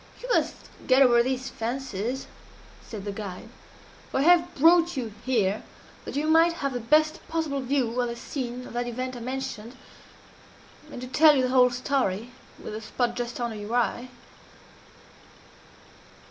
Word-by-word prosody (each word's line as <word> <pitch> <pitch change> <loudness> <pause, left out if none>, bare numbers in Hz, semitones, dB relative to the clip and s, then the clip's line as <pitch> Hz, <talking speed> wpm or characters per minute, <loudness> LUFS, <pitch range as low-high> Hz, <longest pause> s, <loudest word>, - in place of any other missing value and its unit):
"You - - -8
must - - +1 0.3
get 260 +1 +6
over 240 -2 +5
these 260 +1 -2
fancies," 240 0 -3 0.6
said 210 -3 -8
the 205 - -3
guide, 200 +1 -7 0.6
"for 265 - 0
I - - +2
have 350 +1 +4
brought 335 +2 +5
you 230 -5 -3
here 215 -5 +1 0.4
that - - -6
you 290 +2 0
might 325 +2 +5
have 280 -5 -3
the 245 - -2
best 310 +6 +2
possible 315 -4 -2
view 250 -2 0
of 245 - 0
the 235 - -4
scene 250 0 -5
of - - -10
that 240 0 -2
event 255 +2 -4
I - - -7
mentioned 255 -1 -5 1.1
and - - -7
to 255 - -6
tell 300 +4 +6
you 260 - +2
the 255 - +1
whole 250 -1 +5
story 245 -4 -1 0.3
with - - -8
the 215 - -5
spot 235 +2 -2
just 240 0 -4
under 235 -2 -2
your 210 +3 -4
eye. 245 +1 0
250 Hz, 165 wpm, -26 LUFS, 235-275 Hz, 1.1 s, get